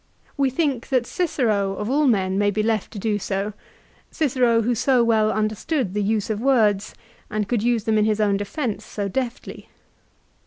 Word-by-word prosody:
We 275 -2 +2
think 265 -3 -1
that 255 -3 +2
Cicero 220 - 0
of 210 - -4
all 285 +4 +2
men 190 -5 +1
may 205 0 +3
be 210 +1 -1
left 220 -2 0
to - - -7
do 210 0 -1
so, 195 +2 -3 0.6
Cicero 245 -6 +2
who 240 +3 +1
so 245 +1 +2
well 220 -2 +3
understood 215 - -1
the 210 - 0
use 210 +1 0
of 215 0 -3
words, 220 -6 +2 0.3
and 210 -1 -2
could 235 -1 0
use 235 -1 +1
them 220 -1 +2
in 210 - +3
his 215 0 +1
own 205 -2 +2
defence 215 +1 -3
so 205 -2 -4
deftly. 245 +4 -5
220 Hz, 185 wpm, -22 LUFS, 205-245 Hz, 0.6 s, may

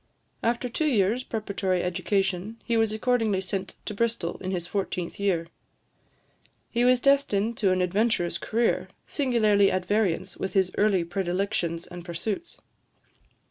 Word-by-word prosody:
After 240 +2 0
two 305 +6 -1
years' 230 -1 +2
preparatory 200 -6 -1
education, 195 +3 -1
he 235 - 0
was 225 -1 +3
accordingly 220 -3 +1
sent 190 0 -4
to - - -4
Bristol, 225 -5 -1
in 185 - -5
his 180 -3 -2
fourteenth 180 -2 -3
year. 185 -5 +1 1.3
He 240 0 +1
was 250 0 +5
destined 235 -5 +2
to 195 -4 +2
an 185 0 +2
adventurous 190 -1 +1
career, 230 +1 0 0.2
singularly 215 -8 +3
at 185 -1 -1
variance 190 -3 0
with 190 - -3
his 190 -2 +2
early 205 -4 +3
predilections 175 -1 -1
and 175 -1 -9
pursuits. 195 - -4
200 Hz, 140 wpm, -26 LUFS, 185-230 Hz, 1.3 s, was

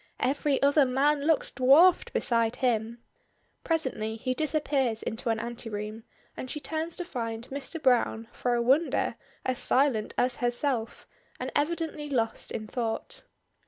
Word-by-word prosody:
Every 275 +1 +1
other 285 +1 +5
man 280 +3 +2
looks 320 -3 +2
dwarfed 285 +8 +5
beside 230 -2 +1
him. 235 -1 -1 0.6
Presently 260 -10 -1
he 255 +3 -2
disappears 280 -5 0
into 225 +2 -3
an 225 -1 +1
anteroom, 225 -1 -5 0.3
and 255 - -6
she 300 - -4
turns 320 +3 -2
to 355 - -4
find 230 -6 -5
Mr. 280 +4 -3
Browne, 245 -4 +2
for 245 -1 -1
a 235 - +1
wonder, 275 +7 +2 0.3
as 255 0 -1
silent 260 -7 +2
as 245 0 +1
herself, 240 -1 -1 0.3
and - - -4
evidently 305 -1 -1
lost 230 -5 -1
in 215 - -4
thought. 235 - -3
255 Hz, 140 wpm, -28 LUFS, 230-290 Hz, 0.6 s, other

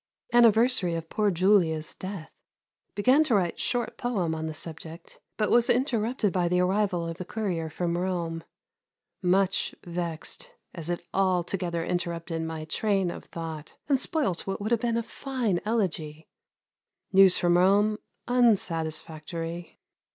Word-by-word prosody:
Anniversary 230 -5 +4
of 165 0 -6
poor 210 -1 +2
Julia's 175 -4 +2
death. 185 -4 -7 0.6
Began 255 +9 +4
to 245 - +2
write 180 -4 0
short 245 -1 -2
poem 195 -10 -1
on 160 0 -3
the 160 - -4
subject, 165 +1 -7 0.2
but 215 - +1
was 240 0 +4
interrupted 235 - +1
by 180 -2 +1
the 180 +1 +2
arrival 185 -2 +1
of 165 0 -5
the 180 - -5
courier 180 -5 -3
from 170 +2 -2
Rome. 175 -2 -2 0.8
Much 190 +1 +1
vexed, 170 - -5 0.2
as 165 -1 -6
it 175 - -3
altogether 180 -2 0
interrupted 170 -1 -3
my 160 -1 -4
train 195 +2 0
of - - -9
thought 160 -2 -7
and 275 -3 +3
spoilt 275 - -1
what 195 - -2
would 210 +3 -3
have 235 -2 +2
been 235 -1 0
a 235 - -1
fine 240 -8 -2
elegy. 165 -8 -2 0.9
News 190 -1 +7
from 175 0 +3
Rome 205 +4 +4 0.3
unsatisfactory. 170 -7 -1
180 Hz, 140 wpm, -27 LUFS, 165-215 Hz, 0.9 s, News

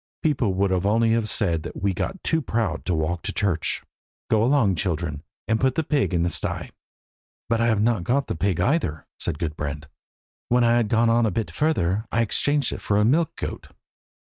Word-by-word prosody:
People 130 - +1
would 100 0 +1
only 105 +5 +2
have 115 -1 +1
said 85 -7 +1
that - - -7
we 100 - +3
had - - -6
got 190 - -4
too 160 -1 +1
proud 115 -4 -2
to 90 - 0
walk 80 +2 -1
to - - -3
church. 95 -6 0 0.5
Go 110 -1 +4
along, 120 -6 +3
children, 80 -4 -2 0.3
and 110 +1 +1
put 130 -1 +2
the 160 - +1
pig 145 -6 +1
in 85 -2 +1
the 85 - +1
sty." - - -4 0.8
"But 115 0 +1
I 115 - +3
have 110 -3 +2
not 115 -5 +1
got 135 +8 +1
the - - -3
pig 90 +1 0
either," 90 - 0
said 85 -4 -3
Gudbrand. 75 -2 -4 0.6
"When 125 0 +3
I 120 0 +4
had 115 -3 +1
gone 115 0 +3
on 115 0 +3
a - - +2
bit 110 +3 -3
further 110 - 0
I 115 - +2
exchanged 145 +5 +1
it - - -7
for 100 - +1
a 105 - +3
milch 155 +7 +3
goat." - - -6
110 Hz, 210 wpm, -24 LUFS, 90-120 Hz, 0.8 s, Go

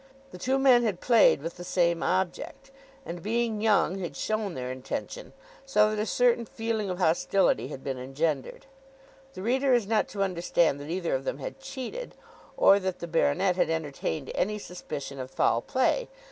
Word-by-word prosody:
The 180 - -10
two 260 +7 +1
men 265 -3 +6
had 210 -7 -1
played 225 - +4
with 165 +2 -5
the 175 - -7
same 170 -1 +1
object, 190 +8 -2 0.3
and 175 -6 -6
being 225 +1 -1
young 205 -3 +2
had 175 -3 -5
shown 215 -4 -2
their 125 0 -4
intention, 130 - -6 0.3
so 215 -6 +3
that 210 - -1
a 215 - -2
certain 240 0 +3
feeling 225 -3 -2
of 180 - -3
hostility 180 -1 +2
had 135 -2 -8
been 135 -2 -3
engendered. 135 +2 -2 0.7
The 185 - -6
reader 260 +3 +3
is 235 -4 +1
not 215 +1 +1
to 200 -1 -2
understand 170 -5 +1
that 145 +2 -8
either 170 0 -2
of 135 0 -1
them 135 - -3
had 145 - -7
cheated, 275 - -7 0.4
or 200 - +6
that 190 -2 -3
the - - -6
baronet 170 +2 +1
had - - +2
entertained 155 -2 -3
any 210 +3 0
suspicion 145 -8 -7
of 130 0 -5
foul 120 -2 +1
play. 260 - 0
185 Hz, 180 wpm, -27 LUFS, 160-225 Hz, 0.7 s, men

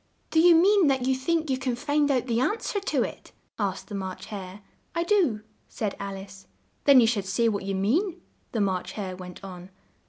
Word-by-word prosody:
"Do 320 - +3
you 345 +1 +7
mean 380 +1 +5
that 265 -2 +1
you 265 - +3
think 315 +3 0
you 260 - 0
can 255 -2 -1
find 290 +3 +1
out 255 -3 +1
the 235 -2 0
an 410 - +1
swer 405 -3 -3
to - - +1
it?" - - -8 0.3
asked 195 -2 -2
the - - -9
March 190 -2 -5
Hare. 195 -2 -8 0.3
"I 335 - +1
do," 340 - +2 0.3
said 210 -3 -3
Al 200 0 -4
ice. 195 0 -12 0.4
"Then 280 -2 +8
you 235 - +6
should 220 -4 0
say 195 +5 +1
what 200 -3 -1
you 195 0 -2
mean," 325 - 0 0.3
the 225 - -1
March 190 -2 -1
Hare 190 -3 -5
went 180 0 -10
on. 180 -1 -9
230 Hz, 215 wpm, -26 LUFS, 195-300 Hz, 0.4 s, Then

